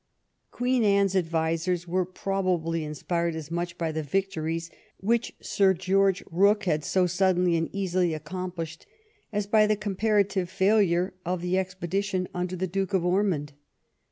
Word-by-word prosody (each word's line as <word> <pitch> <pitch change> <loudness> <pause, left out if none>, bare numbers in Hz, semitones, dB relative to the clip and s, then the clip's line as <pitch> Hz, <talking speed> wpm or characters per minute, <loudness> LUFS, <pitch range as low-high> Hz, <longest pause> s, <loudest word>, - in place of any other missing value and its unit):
Queen 250 -1 +1
Anne's 200 -2 +3
advisers 165 0 0
were 180 +1 0
probably 180 -4 -1
inspired 170 +3 -2
as 160 -1 -7
much 175 +1 -3
by 165 -2 -1
the 155 0 -2
victories 165 0 -2 0.3
which 230 +4 0
Sir 190 -1 +2
Qeorge 190 +1 +2
Booke 200 +5 +4
had 155 -5 0
so 185 +3 +2
suddenly 180 -1 +2
and 165 0 0
easily 185 -4 0
accomplished 165 0 -6 0.4
as 205 -1 -1
by 215 +1 +4
the 215 - +3
comparative 200 -2 0
failure 190 -2 +2
of 180 0 -2
the 180 +1 0
expedition 185 0 -1
under 180 0 -2
the 185 +1 -1
Duke 195 +2 -1
of 180 -2 +1
Ormond. 180 -6 +1
185 Hz, 145 wpm, -27 LUFS, 170-195 Hz, 0.4 s, Booke